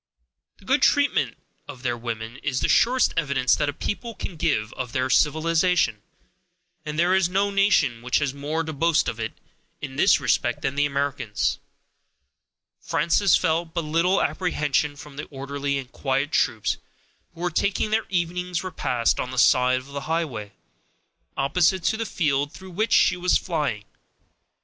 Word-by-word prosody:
The -, -, -20 dB
good -, -, +2 dB
treatment -, -, +2 dB, 0.3 s
of 125 Hz, -, -10 dB
their 120 Hz, -2 st, 0 dB
women 115 Hz, 0 st, -6 dB
is 130 Hz, -3 st, -2 dB
the -, -, +1 dB
surest 250 Hz, +2 st, +3 dB
evidence 140 Hz, -6 st, +1 dB
that 145 Hz, -, +1 dB
a -, -, 0 dB
people 210 Hz, -, -4 dB
can 180 Hz, -, -6 dB
give 140 Hz, -10 st, -1 dB
of 125 Hz, -2 st, -6 dB
their 130 Hz, 0 st, 0 dB
civilization; 160 Hz, -, +2 dB, 0.8 s
and 150 Hz, -1 st, -5 dB
there 175 Hz, +3 st, +3 dB
is 190 Hz, -2 st, +3 dB
no 200 Hz, +2 st, +1 dB
nation 195 Hz, -, +2 dB
which 125 Hz, +2 st, +1 dB
has 145 Hz, -3 st, -1 dB
more 150 Hz, +3 st, -2 dB
to 160 Hz, -1 st, -5 dB
boast 165 Hz, +2 st, +2 dB
of, -, -, -3 dB
in -, -, -9 dB
this -, -, +5 dB
respect, -, -, 0 dB
than 135 Hz, -, 0 dB
the 145 Hz, +1 st, +1 dB
Americans. 140 Hz, -6 st, -1 dB, 1.2 s
Frances 185 Hz, +2 st, +2 dB
felt 165 Hz, +1 st, 0 dB
but 170 Hz, -, 0 dB
little 165 Hz, +5 st, +2 dB
apprehension 150 Hz, -6 st, 0 dB
from 145 Hz, -1 st, -12 dB
the 145 Hz, -, -5 dB
orderly 140 Hz, 0 st, -3 dB
and 130 Hz, -1 st, -7 dB
quiet 135 Hz, +2 st, -1 dB
troops 110 Hz, -9 st, +1 dB, 0.6 s
who 170 Hz, -, -11 dB
were 180 Hz, 0 st, -1 dB
taking 200 Hz, +5 st, 0 dB
their 220 Hz, +1 st, +1 dB
evening's 180 Hz, 0 st, -2 dB
repast 125 Hz, -10 st, 0 dB
on 125 Hz, -, -2 dB
the 130 Hz, -, -7 dB
side 125 Hz, +1 st, +4 dB
of 130 Hz, -, -7 dB
the 140 Hz, -, -4 dB
highway, 135 Hz, -12 st, -2 dB, 0.8 s
opposite 170 Hz, +6 st, +2 dB
to 220 Hz, -, +1 dB
the 225 Hz, 0 st, -3 dB
field 145 Hz, -5 st, 0 dB
through 190 Hz, 0 st, -12 dB
which 215 Hz, +6 st, -1 dB
she -, -, +5 dB
was 180 Hz, 0 st, +2 dB
flying. 150 Hz, -, -2 dB
150 Hz, 165 wpm, -24 LUFS, 130-175 Hz, 1.2 s, this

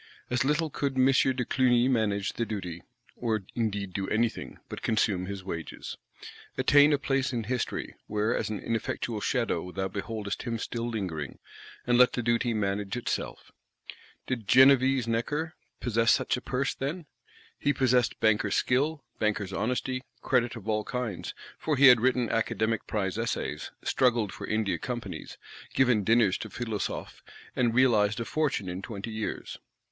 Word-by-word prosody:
As 125 Hz, 0 st, +2 dB
little 150 Hz, +3 st, +1 dB
could 140 Hz, -1 st, -2 dB
M. 130 Hz, -, +5 dB
de 130 Hz, -1 st, +3 dB
Clugny 125 Hz, -1 st, +3 dB
manage 105 Hz, -6 st, +1 dB
the 120 Hz, -, -1 dB
duty; 90 Hz, -7 st, -5 dB, 0.3 s
or 110 Hz, -4 st, -1 dB
indeed 105 Hz, -5 st, -2 dB
do 95 Hz, 0 st, -2 dB
anything, 115 Hz, +1 st, -1 dB
but -, -, -7 dB
consume 100 Hz, -4 st, +1 dB
his 100 Hz, -1 st, -5 dB
wages; 85 Hz, -4 st, -6 dB, 0.6 s
attain 145 Hz, +1 st, +6 dB
"a 145 Hz, -, +4 dB
place 135 Hz, -1 st, 0 dB
in 120 Hz, -3 st, -2 dB
History," 125 Hz, +2 st, -3 dB
where 105 Hz, +2 st, 0 dB
as -, -, -1 dB
an 105 Hz, -, -2 dB
ineffectual 115 Hz, -1 st, -2 dB
shadow 100 Hz, -9 st, -1 dB
thou 95 Hz, +1 st, -2 dB
beholdest 100 Hz, +1 st, -4 dB
him 115 Hz, -2 st, -2 dB
still 115 Hz, +1 st, -3 dB
lingering;—and 95 Hz, -, -4 dB
let 125 Hz, -, +6 dB
the 120 Hz, -, -2 dB
duty 120 Hz, +1 st, +1 dB
manage 100 Hz, 0 st, -1 dB
itself. 120 Hz, -, -4 dB, 0.7 s
Did 115 Hz, -5 st, -3 dB
Genevese 130 Hz, -1 st, +6 dB
Necker 145 Hz, +8 st, -1 dB, 0.3 s
possess 115 Hz, -1 st, +2 dB
such 130 Hz, -1 st, +2 dB
a 125 Hz, -, -5 dB
Purse, 135 Hz, +2 st, -1 dB
then? 155 Hz, +5 st, -4 dB, 0.5 s
He 145 Hz, -, +2 dB
possessed 125 Hz, -3 st, +2 dB
banker's 105 Hz, -2 st, +2 dB
skill, 145 Hz, +4 st, +1 dB, 0.2 s
banker's 105 Hz, -3 st, 0 dB
honesty; 125 Hz, +4 st, -1 dB, 0.2 s
credit 125 Hz, -2 st, +1 dB
of 110 Hz, -3 st, -9 dB
all 110 Hz, -1 st, +1 dB
kinds, 115 Hz, -7 st, -4 dB, 0.2 s
for 155 Hz, -3 st, 0 dB
he 140 Hz, -, +6 dB
had 125 Hz, -3 st, +7 dB
written 125 Hz, -1 st, +2 dB
Academic 110 Hz, 0 st, 0 dB
Prize 100 Hz, -1 st, -1 dB
Essays, 75 Hz, -9 st, -2 dB
struggled 120 Hz, -5 st, +2 dB
for -, -, -7 dB
India 110 Hz, -2 st, 0 dB
Companies, 120 Hz, -2 st, -6 dB, 0.4 s
given 125 Hz, -5 st, +4 dB
dinners 110 Hz, -2 st, +3 dB
to -, -, -6 dB
Philosophes, 115 Hz, -4 st, -4 dB, 0.3 s
and 120 Hz, -2 st, +1 dB
"realised 110 Hz, -5 st, +4 dB
a 115 Hz, -, -2 dB
fortune 150 Hz, -11 st, -1 dB
in 90 Hz, +1 st, -4 dB
twenty 105 Hz, +1 st, -6 dB
years." 110 Hz, -1 st, -4 dB
115 Hz, 155 wpm, -28 LUFS, 105-130 Hz, 0.7 s, had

